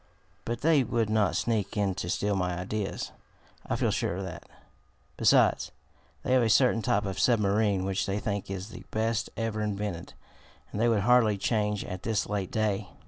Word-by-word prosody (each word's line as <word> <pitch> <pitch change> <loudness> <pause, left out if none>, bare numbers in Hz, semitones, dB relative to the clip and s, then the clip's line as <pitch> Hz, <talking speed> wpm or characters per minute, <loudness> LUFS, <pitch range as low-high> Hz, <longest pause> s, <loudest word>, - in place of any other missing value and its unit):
But 120 0 -3
they 155 -3 +4
would 115 -2 0
not 110 -3 +2
sneak 110 -2 -1
in 100 -2 +1
to 85 - -5
steal 100 +3 0
my 90 -2 -1
ideas. 100 +3 -3 0.6
I - - 0
feel - - +1
sure - - -1
of 95 - -4
that. 95 - -8 0.7
Besides, - - +3 0.5
they 130 - +1
have 130 - +5
a 115 - +2
certain 115 +1 +4
type 105 0 +1
of 95 -1 -4
submarine 105 -4 +2
which 95 0 -1
they 100 +1 -1
think 100 -2 -3
is 95 +2 -5
the - - -10
best 115 +1 -1
ever 115 -1 -2
invented, 100 -4 -3 0.6
and 105 - -3
they 120 - +4
would 110 -3 +2
hardly 110 -2 +4
change 105 -1 0
at 95 0 -6
this 110 -3 -1
late 100 -3 -2
day. 105 -3 -1
105 Hz, 185 wpm, -28 LUFS, 100-115 Hz, 0.7 s, have